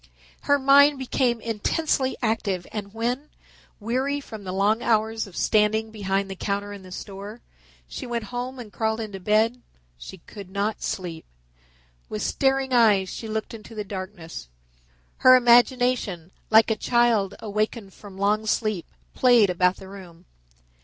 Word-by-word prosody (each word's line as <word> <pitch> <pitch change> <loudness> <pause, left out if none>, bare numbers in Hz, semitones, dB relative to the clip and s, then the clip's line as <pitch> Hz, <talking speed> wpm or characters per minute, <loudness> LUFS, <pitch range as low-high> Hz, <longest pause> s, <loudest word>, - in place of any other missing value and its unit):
Her 285 - +3
mind 280 +1 +6
became 255 -2 0
intensely 260 +5 -1
active 205 -5 -1
and 205 -2 -6
when, 245 +6 -3 0.5
weary 260 +6 -1
from 220 -7 -10
the 185 - -4
long 205 +4 +1
hours 220 -1 0
of 185 - -12
standing 220 +1 +2
behind 195 -2 -1
the 195 - -6
counter 200 +1 -3
in 200 - -9
the 185 -1 -13
store, 200 +4 -8 0.5
she 260 - -7
went 235 -1 -3
home 250 +2 -4
and 230 -4 -10
crawled 220 0 -1
into 210 -3 -6
bed, 220 +5 +1 0.4
she 190 - -10
could 195 +2 -12
not 200 +3 -2
sleep. 170 -4 -4 0.9
With 105 - -4
staring 270 -1 +1
eyes 210 -6 +4
she 225 - -7
looked 220 +1 -4
into 225 0 -11
the 210 - -3
darkness. 185 - -8 0.7
Her 255 0 +7
imagination, 245 -7 +3 0.2
like 220 +1 +5
a - - +2
child 230 -4 +2
awakened 215 -1 -3
from 200 -2 -13
long 210 +2 +1
sleep, 215 -5 -1 0.3
played 240 -6 +5
about 180 +1 +2
the 190 - -12
room. 185 -3 -12
215 Hz, 150 wpm, -24 LUFS, 195-240 Hz, 0.9 s, Her